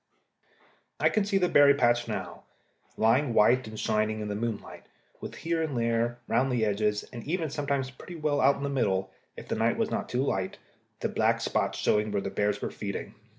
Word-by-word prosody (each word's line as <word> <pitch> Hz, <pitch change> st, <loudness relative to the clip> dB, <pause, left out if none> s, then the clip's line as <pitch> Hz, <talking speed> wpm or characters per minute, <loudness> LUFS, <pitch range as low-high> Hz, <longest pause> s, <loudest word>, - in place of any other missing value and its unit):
I -, -, +4 dB
can 215 Hz, -2 st, +1 dB
see 200 Hz, -1 st, +1 dB
the 180 Hz, -2 st, +2 dB
berry 145 Hz, -3 st, +6 dB
patch 120 Hz, -2 st, +2 dB
now, 95 Hz, -6 st, -5 dB, 0.6 s
lying 120 Hz, +3 st, +2 dB
white 120 Hz, +3 st, +4 dB
and 110 Hz, 0 st, -8 dB
shining 110 Hz, 0 st, 0 dB
in 105 Hz, -1 st, -4 dB
the 100 Hz, -, -2 dB
moonlight, 115 Hz, 0 st, -5 dB, 0.3 s
with -, -, -7 dB
here 165 Hz, 0 st, -1 dB
and 150 Hz, -5 st, -2 dB
there 115 Hz, +1 st, 0 dB
round 135 Hz, +1 st, +2 dB
the 120 Hz, -3 st, +1 dB
edges, 105 Hz, 0 st, 0 dB
and 120 Hz, -, -7 dB
even 160 Hz, -1 st, -2 dB
sometimes 140 Hz, -3 st, -2 dB
pretty 170 Hz, +7 st, -11 dB
well 150 Hz, -3 st, 0 dB
out 140 Hz, +2 st, +5 dB
into 140 Hz, 0 st, -3 dB
the 140 Hz, -, -3 dB
middle, 95 Hz, -7 st, 0 dB, 0.3 s
if -, -, -9 dB
the -, -, -2 dB
night -, -, +1 dB
was -, -, 0 dB
not -, -, -2 dB
too 125 Hz, +2 st, 0 dB
light, 95 Hz, -8 st, -2 dB, 0.4 s
the -, -, +1 dB
black -, -, +1 dB
spots -, -, -1 dB
showing 105 Hz, 0 st, +1 dB
where 100 Hz, -, 0 dB
the 100 Hz, -, -4 dB
bears 105 Hz, 0 st, -1 dB
were -, -, -2 dB
feeding. 100 Hz, 0 st, -5 dB
120 Hz, 205 wpm, -28 LUFS, 105-140 Hz, 0.6 s, berry